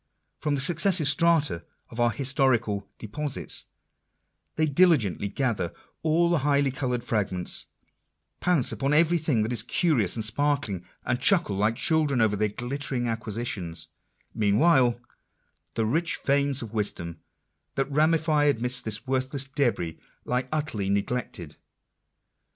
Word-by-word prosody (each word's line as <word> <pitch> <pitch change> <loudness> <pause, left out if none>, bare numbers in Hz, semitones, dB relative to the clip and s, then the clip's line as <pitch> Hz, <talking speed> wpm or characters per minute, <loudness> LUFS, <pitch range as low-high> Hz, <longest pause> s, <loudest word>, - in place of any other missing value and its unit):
From 150 -2 0
the 135 - -1
successive 170 +1 +2
strata 145 - +2 0.3
of 115 - -8
our 120 0 +4
historical 120 -6 0
deposits, 140 +6 -2 0.9
they 155 - +2
diligently 145 - +3
gather 115 - -1 0.3
all 165 +2 +2
the 170 - +3
highly 140 -1 +2
coloured 125 -2 -2
fragments, 95 -6 -1 0.7
pounce 175 -8 +2
upon 140 +1 -1
every 170 +2 +4
thing 145 -8 +1
that 115 +3 -2
is 115 - 0
curious 120 - +1
and 110 -2 -1
sparkling, 125 -5 0 0.2
and 125 0 0
chuckle 175 - +3
like 105 +3 +1
children 150 -2 +1
over 110 -2 +3
their 105 +1 0
glittering 125 +2 -2
acquisitions; 105 -7 -3 0.4
meanwhile 120 +3 +3 0.8
the 110 - +1
rich 165 +9 0
veins 140 -1 +1
of 115 -1 -9
wisdom 85 -6 -3 0.6
that 135 - +1
ramify 155 0 +2
amidst 125 -2 +1
this 110 0 -2
worthless 130 +1 -2
debris, 125 - -1 0.3
lie 125 +1 -1
utterly 145 -11 -2
neglected. 100 +5 -3
130 Hz, 130 wpm, -26 LUFS, 110-150 Hz, 0.9 s, our